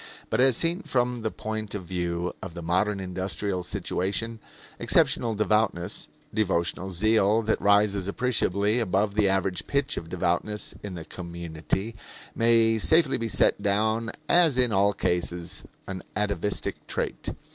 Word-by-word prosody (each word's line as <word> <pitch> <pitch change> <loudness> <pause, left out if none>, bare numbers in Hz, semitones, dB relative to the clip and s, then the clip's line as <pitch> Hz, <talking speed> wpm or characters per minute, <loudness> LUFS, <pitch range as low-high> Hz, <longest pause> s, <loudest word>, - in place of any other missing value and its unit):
But - - +2
as 130 -2 +4
seen 170 +3 +1
from 125 - 0
the 110 - -1
point 110 -1 -5
of 100 - -4
view 85 0 -2
of 90 -3 -7
the 85 - -6
modern 95 +4 +1
industrial 95 +1 -2
situation, 105 +6 -2 0.4
exceptional 115 -2 +2
devoutness 105 -4 0 0.3
devotional 95 -2 0
zeal 110 +3 +3
that 110 0 0
rises 100 -1 +3
appreciably 105 -1 +1
above 100 -1 +1
the 105 -1 +3
average 95 -3 0
pitch 140 -1 0
of 80 - -5
devoutness 90 +4 -1
in 100 -3 -6
the 80 -2 -7
community 85 +4 -4 0.4
may 115 -1 +3
safely 160 +2 +3
be 115 0 -2
set 100 - +2
down 110 +3 +1 0.2
as 165 -6 +5
in 125 -2 +3
all 100 0 +3
cases 85 -2 -1 0.2
an 95 -1 -6
atavistic 105 -1 -2
trait. - - -3
100 Hz, 140 wpm, -26 LUFS, 90-115 Hz, 0.4 s, as